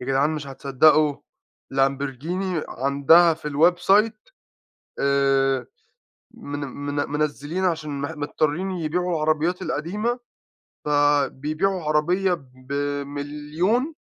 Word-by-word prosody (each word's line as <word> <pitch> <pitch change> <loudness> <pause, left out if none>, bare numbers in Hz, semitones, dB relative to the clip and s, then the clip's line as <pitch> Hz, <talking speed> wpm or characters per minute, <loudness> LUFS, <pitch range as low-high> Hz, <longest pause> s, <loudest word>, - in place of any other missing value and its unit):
يا 125 - -7
جدعان 135 +3 +2
مش 150 -2 -4
هتصدقوا 145 +2 +3 0.6
Lamborghini 140 +6 -1
عندها 140 +6 +4
في 155 -1 -7
الwebsite 195 - +2 0.7
آآ، 135 -2 +2 0.6
من 145 0 -7
من 145 +1 -5
منزِّلين 150 +4 -2
عشان 155 -5 -2
مح 145 +3 -3
مضطرِين 155 +4 -1
يبيعوا 180 +1 -2
العربيَّات 155 +3 0
القديمة، 210 +11 -2 0.7
فبيبيعوا 150 +5 +1
عربية 175 +5 +2 0.3
ب1.000.000، 145 - -2
150 Hz, 90 wpm, -23 LUFS, 140-175 Hz, 0.7 s, عندها